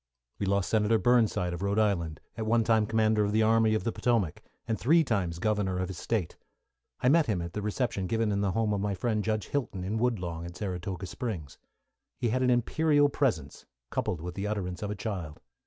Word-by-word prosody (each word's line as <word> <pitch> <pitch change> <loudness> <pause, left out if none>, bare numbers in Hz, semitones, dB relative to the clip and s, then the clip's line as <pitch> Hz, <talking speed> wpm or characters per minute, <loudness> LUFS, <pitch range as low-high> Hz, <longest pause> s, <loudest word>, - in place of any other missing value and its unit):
We 100 - -1
lost 100 -3 +1
Senator 110 0 +3
Burnside 110 -7 +2
of 85 - -5
Rhode 100 +1 0
Island, 90 -8 0
at 110 -1 -4
one 115 +1 +3
time 110 -2 +3
commander 110 -1 +2
of 105 0 -1
the 110 0 +4
Army 110 0 +4
of 110 - -1
the 115 - 0
Potomac, 110 -11 0 0.3
and 110 -2 -1
three 160 +6 +4
times 95 - -1
Governor 100 -1 0
of 90 0 -2
his 90 -2 -6
State. 105 -6 -2 0.6
I - - +2
met 155 +2 +5
him 105 -5 0
at 85 0 -6
a 105 - -2
reception 105 -2 -1
given 110 +1 0
in 100 0 0
the 100 -3 0
home 110 0 +1
of 100 - -1
my 100 -1 -1
friend 110 +1 -1
Judge 110 -3 -1
Hilton, 120 -10 -2
in 105 +4 -2
Woodlawn, 90 -9 -1
at 85 0 -8
Saratoga 95 0 -4
Springs. 95 - -5 0.6
He 120 -3 0
had 130 +3 0
an 125 - +3
imperial 145 +4 +3
presence, 110 - -1 0.2
coupled 85 - -2
with 90 +1 -5
the 100 +3 -3
utterance 95 -4 -3
of 105 - -3
a 105 - -3
child. 95 -8 -5
105 Hz, 215 wpm, -29 LUFS, 90-115 Hz, 0.6 s, met